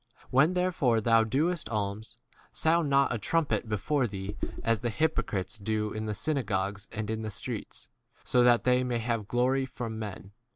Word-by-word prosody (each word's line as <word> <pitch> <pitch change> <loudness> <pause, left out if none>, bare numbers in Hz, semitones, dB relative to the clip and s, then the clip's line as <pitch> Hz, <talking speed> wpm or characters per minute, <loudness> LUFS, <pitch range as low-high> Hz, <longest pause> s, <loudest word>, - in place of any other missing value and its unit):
When 140 +7 +4
therefore 175 -11 +2
thou 115 0 +4
doest 155 +9 0
alms, 105 0 -3 0.3
sound 160 -1 +2
not 140 -2 +3
a 115 - -2
trumpet 150 -1 0
before 125 +5 +1
thee, 100 0 -5 0.3
as 115 -2 +2
the 120 - -1
hypocrites 110 -7 -1
do 105 +1 -1
in 110 0 -4
the 105 - -2
synagogues 100 -6 -1
and 110 -1 -4
in 110 0 -2
the 110 - -4
streets, 100 - -6 0.4
so 125 - +3
that 120 -1 +5
they 125 0 +3
may 125 -1 -1
have 115 -2 -2
glory 130 +3 +1
from 115 -3 -5
men. 100 -2 -7
115 Hz, 170 wpm, -29 LUFS, 105-135 Hz, 0.4 s, that